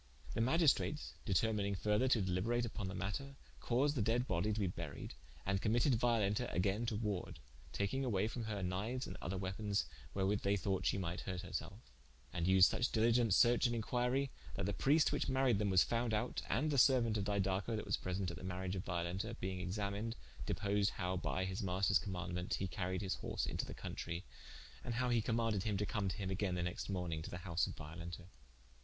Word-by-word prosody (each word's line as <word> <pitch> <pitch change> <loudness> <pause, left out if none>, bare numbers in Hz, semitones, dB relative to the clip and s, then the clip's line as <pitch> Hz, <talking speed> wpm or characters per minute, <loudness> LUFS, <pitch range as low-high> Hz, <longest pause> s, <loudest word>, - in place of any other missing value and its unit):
The - - 0
Magistrates 150 +2 +2
determining 100 -1 +1
further 105 +6 +2
to 120 -6 +3
deliberate 100 +7 +1
vpon 105 -4 -4
the 95 - -5
matter, 135 +8 -3 0.2
caused 135 +4 +2
the 125 - +1
dead 115 +4 +1
bodie 95 0 +1
to 105 - -1
be 100 - +2
buried, 85 -5 -5 0.3
and 95 0 +1
committed 120 +5 +3
Violenta 115 -1 +2
againe 100 +6 +1
to 115 - 0
warde, 105 -4 -2 0.3
taking 100 +7 -1
away 105 -5 +1
from 115 0 -4
her 105 -3 -3
kniues 105 +8 -2
and - - -6
other 95 +3 -3
weapons, 100 -1 -1 0.3
wherewith 100 +1 +1
they 100 +1 +2
thought 95 -1 0
shee - - +2
might 90 -2 -2
hurt 90 -2 -4
her 90 - -9
selfe. 95 - -5 0.4
And 85 -1 0
vsed 95 0 +6
such 120 +7 +4
diligent 115 -2 +4
search 120 +1 +5
and 120 - -1
inquirie, 125 +4 0 0.2
that - - -1
the - - 0
Priest 150 +3 +4
which - - 0
maried 130 -5 +3
them 105 -1 +1
was 95 -2 +6
found 115 -1 0
out, 110 +4 -1
and 155 +2 +1
the 140 - +1
seruaunt 120 -4 +5
of 100 - -1
Didaco 100 +1 0
that 105 - -3
was 100 - +1
present 90 0 -2
at - - -7
the - - -10
mariage 95 0 -3
of 95 - -3
Violenta, 90 +6 -2
being 95 0 -3
examined, 100 +4 -2 0.3
deposed 100 0 +1
how 90 -1 -1
by 95 +1 -1
his 95 +1 -3
maister's 95 0 +2
commaundement 90 -2 -3
he 95 - -2
caried 95 +1 -2
his 95 - 0
horse - - -2
into - - -3
the - - -6
countrie, 85 +2 -5 0.6
and 120 - -3
how 125 +1 +1
he 120 -2 +3
commaunded 115 -3 +1
him 105 -1 0
to 105 - 0
come 100 -2 -1
to - - -4
him 95 -2 -3
againe 95 -1 0
the 90 - -1
nexte 90 +3 -3
morning 90 -4 -2
to - - -6
the - - -5
house 85 -2 +1
of - - -6
Violenta. 85 +3 -7
100 Hz, 210 wpm, -37 LUFS, 95-115 Hz, 0.6 s, vsed